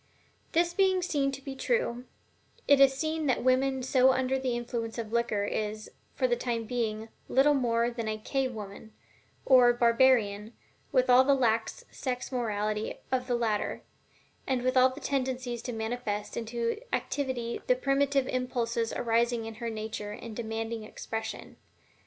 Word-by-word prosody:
This 345 Hz, +1 st, +2 dB
being 375 Hz, -1 st, +2 dB
seen 285 Hz, -5 st, 0 dB
to 275 Hz, 0 st, -8 dB
be 275 Hz, -, -5 dB
true, 260 Hz, -, -1 dB, 0.6 s
it 285 Hz, -1 st, +6 dB
is 270 Hz, -1 st, +6 dB
seen 315 Hz, +1 st, -1 dB
that 255 Hz, -, +3 dB
the -, -, -5 dB
woman 260 Hz, +1 st, +2 dB
so 260 Hz, 0 st, +4 dB
under 260 Hz, +1 st, 0 dB
the 255 Hz, -2 st, -1 dB
influence 235 Hz, -1 st, -4 dB
of 225 Hz, -1 st, -5 dB
liquor 235 Hz, -3 st, +1 dB
is, 215 Hz, +1 st, -3 dB, 0.2 s
for -, -, +2 dB
the 485 Hz, -, +2 dB
time 235 Hz, -, -2 dB
being, 225 Hz, -1 st, -3 dB, 0.2 s
little 280 Hz, +3 st, +4 dB
more 235 Hz, -3 st, +1 dB
than 230 Hz, -2 st, -4 dB
a 215 Hz, 0 st, -2 dB
"cave 260 Hz, +4 st, -1 dB
woman," 215 Hz, 0 st, -9 dB, 0.5 s
or 250 Hz, -2 st, +7 dB
barbarian, 235 Hz, -3 st, +3 dB, 0.4 s
with 255 Hz, 0 st, +3 dB
all 250 Hz, +1 st, +7 dB
the 280 Hz, +1 st, +4 dB
lax 235 Hz, -, 0 dB
sex 250 Hz, -1 st, -4 dB
morality 215 Hz, -3 st, -2 dB, 0.2 s
of 255 Hz, -1 st, 0 dB
the 245 Hz, -, +1 dB
latter, 220 Hz, -3 st, -1 dB, 0.6 s
and 255 Hz, -2 st, 0 dB
with 255 Hz, +1 st, +1 dB
all 255 Hz, 0 st, +6 dB
the 260 Hz, +3 st, -9 dB
tendencies 255 Hz, -4 st, -2 dB
to 245 Hz, -, -5 dB
manifest 220 Hz, -2 st, -3 dB
into 235 Hz, -, -2 dB
activity 255 Hz, -4 st, -2 dB
the 250 Hz, -, +4 dB
primitive 275 Hz, 0 st, +1 dB
impulses 235 Hz, -2 st, -1 dB
arising 235 Hz, 0 st, +1 dB
in 225 Hz, -, -6 dB
her 235 Hz, -, -2 dB
nature 215 Hz, -1 st, -5 dB
and 220 Hz, +1 st, -8 dB
demanding 225 Hz, 0 st, -4 dB
expression. 220 Hz, +1 st, -6 dB
245 Hz, 160 wpm, -29 LUFS, 225-265 Hz, 0.6 s, or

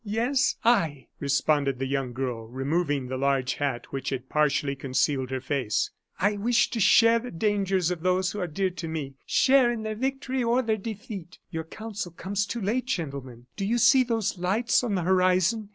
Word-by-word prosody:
"Yes, 240 Hz, +6 st, +1 dB
I," 165 Hz, -, +2 dB
responded 140 Hz, -1 st, +1 dB
the 135 Hz, -, -2 dB
young 135 Hz, -2 st, -2 dB
girl, 120 Hz, -3 st, -4 dB
removing 140 Hz, +3 st, -1 dB
the 130 Hz, +1 st, -4 dB
large 135 Hz, -1 st, +1 dB
hat 135 Hz, -5 st, -3 dB
which 135 Hz, -1 st, -3 dB
had 130 Hz, -1 st, -5 dB
partially 150 Hz, -2 st, +1 dB
concealed 135 Hz, 0 st, 0 dB
her 130 Hz, 0 st, -2 dB
face; 125 Hz, -5 st, -1 dB, 0.3 s
"I 205 Hz, +3 st, +2 dB
wish 235 Hz, +4 st, +2 dB
to 235 Hz, -, -2 dB
share 230 Hz, +3 st, +6 dB
the 245 Hz, +2 st, -7 dB
dangers 195 Hz, -2 st, 0 dB
of 175 Hz, -2 st, -4 dB
those 185 Hz, +1 st, +1 dB
who 210 Hz, -, -5 dB
are 180 Hz, -, -1 dB
dear 185 Hz, +4 st, -1 dB
to 175 Hz, -2 st, -6 dB
me 155 Hz, -4 st, -4 dB
share 260 Hz, -2 st, +4 dB
in 230 Hz, -2 st, -4 dB
their 215 Hz, 0 st, -2 dB
victory 265 Hz, +2 st, -2 dB
or 240 Hz, +2 st, +2 dB
their 220 Hz, -2 st, 0 dB
defeat. 200 Hz, -4 st, -7 dB
Your 160 Hz, -2 st, -4 dB
counsel 210 Hz, 0 st, -6 dB
comes 200 Hz, +3 st, -2 dB
too 235 Hz, -, -4 dB
late, 230 Hz, +6 st, 0 dB
gentlemen. 135 Hz, -, -4 dB
Do -, -, -4 dB
you 225 Hz, +5 st, +1 dB
see 255 Hz, +2 st, +6 dB
those 225 Hz, -6 st, -1 dB
lights 215 Hz, +8 st, +1 dB
on 220 Hz, -5 st, 0 dB
the 180 Hz, -, -1 dB
horizon? 185 Hz, +4 st, +2 dB
185 Hz, 190 wpm, -26 LUFS, 140-220 Hz, 0.3 s, share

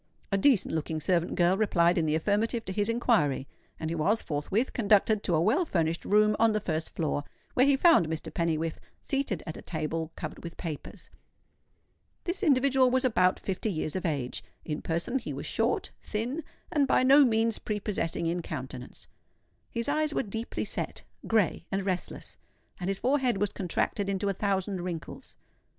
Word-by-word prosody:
A 195 Hz, -, +3 dB
decent 225 Hz, -, +4 dB
looking 160 Hz, 0 st, -2 dB
servant 175 Hz, +2 st, +1 dB
girl 175 Hz, +1 st, +4 dB
replied 180 Hz, -4 st, +3 dB
in 165 Hz, -3 st, +1 dB
the 155 Hz, -, +2 dB
affirmative 215 Hz, +7 st, 0 dB
to 190 Hz, -, -4 dB
his 205 Hz, +2 st, 0 dB
inquiry; 215 Hz, -, +2 dB, 0.3 s
and 160 Hz, 0 st, -3 dB
he -, -, -1 dB
was 195 Hz, +8 st, +2 dB
forthwith 175 Hz, -, -1 dB
conducted 210 Hz, -1 st, +3 dB
to 175 Hz, -, 0 dB
a -, -, +3 dB
well 270 Hz, -, +3 dB
furnished 165 Hz, -, -1 dB
room 210 Hz, +1 st, +4 dB
on 225 Hz, -1 st, +4 dB
the 215 Hz, -, +1 dB
first 160 Hz, -5 st, -3 dB
floor, 150 Hz, -2 st, -1 dB, 0.3 s
where 255 Hz, +2 st, +4 dB
he 280 Hz, -1 st, +4 dB
found 330 Hz, -, +5 dB
Mr. 160 Hz, 0 st, -4 dB
Pennywhiffe 165 Hz, -1 st, -1 dB, 0.3 s
seated 275 Hz, -, -1 dB
at 160 Hz, -, -6 dB
a -, -, -8 dB
table 160 Hz, 0 st, -3 dB
covered -, -, -7 dB
with 170 Hz, 0 st, -8 dB
papers. 160 Hz, -5 st, -7 dB, 1.1 s
This 360 Hz, +3 st, -2 dB
individual 270 Hz, -5 st, +4 dB
was 260 Hz, +1 st, +2 dB
about 185 Hz, -7 st, +3 dB
fifty 195 Hz, +3 st, -2 dB
years 155 Hz, -3 st, -2 dB
of 185 Hz, -, -2 dB
age. 135 Hz, -, -2 dB, 0.2 s
In 150 Hz, -1 st, -3 dB
person 170 Hz, +11 st, -1 dB
he -, -, -6 dB
was -, -, -5 dB
short, -, -, 0 dB
thin, 245 Hz, +9 st, -3 dB, 0.3 s
and 290 Hz, -5 st, +2 dB
by 255 Hz, -, +3 dB
no 275 Hz, +3 st, +7 dB
means 225 Hz, -2 st, +2 dB
prepossessing 200 Hz, -6 st, -2 dB
in 170 Hz, +1 st, 0 dB
countenance. 130 Hz, -5 st, -7 dB, 0.6 s
His 235 Hz, -1 st, -3 dB
eyes 305 Hz, +1 st, +1 dB
were -, -, +1 dB
deeply 225 Hz, +2 st, -4 dB
set, -, -, -3 dB, 0.2 s
grey, 210 Hz, -6 st, +1 dB
and 195 Hz, 0 st, -1 dB
restless; 185 Hz, -2 st, -4 dB, 0.4 s
and 180 Hz, -, -3 dB
his 195 Hz, 0 st, 0 dB
forehead 255 Hz, -3 st, +1 dB
was 205 Hz, 0 st, 0 dB
contracted 195 Hz, +2 st, -1 dB
into 200 Hz, +1 st, 0 dB
a -, -, +1 dB
thousand 195 Hz, -1 st, -1 dB
wrinkles. 175 Hz, -3 st, -7 dB
195 Hz, 175 wpm, -29 LUFS, 165-230 Hz, 1.1 s, no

